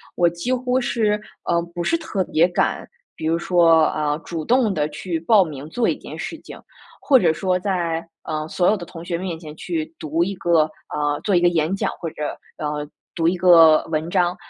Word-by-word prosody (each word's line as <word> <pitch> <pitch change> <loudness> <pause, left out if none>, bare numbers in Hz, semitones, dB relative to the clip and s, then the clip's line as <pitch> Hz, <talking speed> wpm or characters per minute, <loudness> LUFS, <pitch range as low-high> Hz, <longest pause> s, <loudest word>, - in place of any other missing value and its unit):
我 175 - +3
几 170 +9 -3
乎 255 0 0
是， 210 -3 0 0.2
呃， 170 0 +1
不 175 - -2
是 335 - +1
特 315 - -2
别 170 0 +3
敢， 175 - -1 0.3
比 155 - -4
如 165 +1 +2
说 170 -2 +4
啊， 150 -1 0
主 165 -2 -4
动 235 0 +2
地 150 -2 0
去 160 +3 -4
报 195 +4 +4
名 150 -2 -8
做 235 +7 0
一 - - +1
件 - - -10
事 - - -5
情。 - - -11 0.5
或 270 -3 +7
者 - - +3
说 185 +3 0
在， 170 -4 -1 0.2
呃， 155 0 -4
所 180 +4 +2
有 - - +2
的 185 - -7
同 165 0 -10
学 175 - -2
面 175 -1 -4
前 155 -2 -10
去 160 -2 -3
读 160 +2 0
一 195 +2 -2
个， 170 -4 +3 0.3
呃， 145 0 -1
做 200 -3 +1
一 - - +5
个 175 - +4
演 165 +2 0
讲， - - -1
或 165 - -3
者， 150 -1 -5 0.2
呃， 150 -1 -3 0.3
读 165 -1 0
一 180 +2 +1
个 165 -3 +6
文 155 +1 -1
章。 180 -1 +1
170 Hz, 230 characters per minute, -21 LUFS, 155-185 Hz, 0.5 s, 或